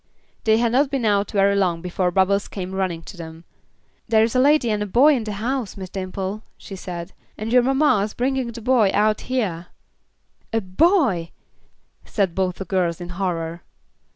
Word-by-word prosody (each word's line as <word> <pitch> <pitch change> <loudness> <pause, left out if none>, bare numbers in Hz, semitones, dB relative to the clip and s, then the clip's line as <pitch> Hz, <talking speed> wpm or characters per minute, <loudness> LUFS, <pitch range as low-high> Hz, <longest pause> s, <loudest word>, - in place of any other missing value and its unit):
They 220 0 +4
had 235 0 +1
not 270 +3 +3
been 270 -4 -1
out 205 -1 +2
very 200 0 +2
long 180 -4 +1
before 180 0 0
Bubbles 195 +2 +2
came 190 -1 -6
running 185 -4 -2
to 195 - -11
them. 160 -1 -9 0.6
"There 220 -1 +4
is 225 +2 -1
a - - +4
lady 280 -3 +4
and 210 -1 -1
a 210 - -2
boy 265 +10 +5
in 240 -5 -1
the 210 - -4
house, 230 +1 -3
Miss 190 -1 -7
Dimple," 190 +2 -4 0.2
she 195 - -9
said, 180 -1 -7 0.2
"and 220 +2 -4
your 250 - +7
mamma's 255 -6 +2
a - - -32
bringin' 255 -1 -1
the 235 0 -9
boy 235 -4 +3
out 215 +1 +2
hyah." 195 -10 -1 0.9
"A 225 - +3
boy!" 200 - +2 0.7
said 195 -5 -1
both 185 -1 -1
the 195 - -6
girls 180 -4 0
in 175 0 -7
horror. 170 -2 -3
200 Hz, 185 wpm, -22 LUFS, 185-235 Hz, 0.9 s, your